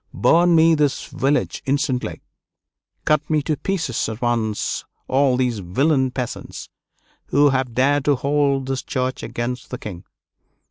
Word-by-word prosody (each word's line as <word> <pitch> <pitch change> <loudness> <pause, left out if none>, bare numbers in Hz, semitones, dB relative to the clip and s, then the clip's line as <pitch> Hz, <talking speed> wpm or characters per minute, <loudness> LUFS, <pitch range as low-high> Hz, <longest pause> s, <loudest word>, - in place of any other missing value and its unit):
"Burn 170 +1 +4
me 165 +1 +6
this 150 -3 +1
village 140 +2 -1
instantly!" 135 -2 -1 0.8
"Cut 150 -1 +1
me 155 -2 +1
to 155 +1 0
pieces 160 - -2
at 110 0 -6
once 115 -3 -1 0.2
all 135 -1 +2
these 125 -4 0
villain 130 - +1
peasants, 125 -1 -6 0.6
who 145 +1 +4
have 130 -3 -1
dared 140 +2 +2
to 145 - +4
hold 140 0 +1
this 135 0 -2
church 130 -1 -3
against 120 +1 -4
the 125 - -5
king!" 90 -7 -8
135 Hz, 140 wpm, -21 LUFS, 125-145 Hz, 0.8 s, me